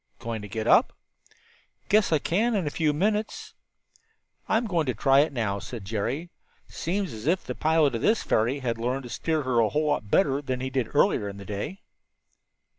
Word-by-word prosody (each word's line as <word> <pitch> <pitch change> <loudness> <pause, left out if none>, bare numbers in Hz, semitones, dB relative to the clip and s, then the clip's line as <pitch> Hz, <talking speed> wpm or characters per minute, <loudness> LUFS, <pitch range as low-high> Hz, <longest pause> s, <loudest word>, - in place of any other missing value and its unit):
"Going 115 -2 -5
to 105 - -7
get 110 +1 -4
up?" - - +4 0.9
"Guess 210 -3 +3
I 155 - +5
can 215 +10 0
in 190 -5 0
a 145 - -2
few 155 -1 +1
minutes." 210 +7 -1 1.0
"I'm 225 +2 +2
going 170 -8 0
to 125 - 0
try 135 0 +4
it 150 +3 +3
now," 110 -6 -1
said 110 0 -8
Jerry. 120 - -3 0.4
"Seems 190 - -3
as 110 +4 -7
if 180 +3 +1
the - - -4
pilot 155 -3 +2
of 115 - -2
this 220 +1 +2
ferry 120 +6 +1
had 115 -3 -2
learned 125 +3 -1
to 120 - -9
steer 155 +4 -1
her 130 -2 +1
a 110 -2 +3
whole 155 +1 0
lot 110 -8 -1
better 140 - +2
than 130 -3 -3
he 130 +1 -4
did 130 -4 -1
earlier 100 - +3
in 100 - -9
the 100 - -9
day." 105 - -5
135 Hz, 200 wpm, -26 LUFS, 115-165 Hz, 1.0 s, I